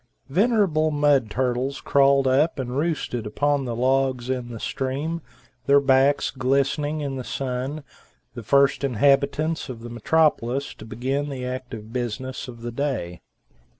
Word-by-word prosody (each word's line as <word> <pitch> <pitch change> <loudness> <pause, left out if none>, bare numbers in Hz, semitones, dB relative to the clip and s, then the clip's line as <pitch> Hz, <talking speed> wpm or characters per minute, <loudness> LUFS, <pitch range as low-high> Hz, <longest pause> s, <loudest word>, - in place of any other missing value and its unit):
Venerable 185 - +2
mud 145 -5 +2
turtles 130 +3 -1
crawled 140 -1 +3
up 140 +5 +2
and 125 -2 -4
roosted 145 -7 -2
upon 145 +5 0
the 120 - -3
old - - -6
logs 130 -1 +1
in 125 -2 -3
the 115 -2 -7
stream, 145 +8 -3 0.5
their 140 0 +6
backs 135 +1 +3
glistening 140 +3 0
in 140 -2 -3
the 130 - -4
sun, 135 +4 -4 0.5
the 120 - -7
first 140 +5 +3
inhabitants 140 +5 +1
of 120 -3 -7
the 120 0 -8
metropolis 140 0 +1
to - - -12
begin 135 +6 -2
the 130 -2 -5
active 125 -4 -6
business 125 +2 -4
of 120 -2 -10
the 120 - -4
day. 115 - -3
135 Hz, 150 wpm, -24 LUFS, 125-145 Hz, 0.5 s, their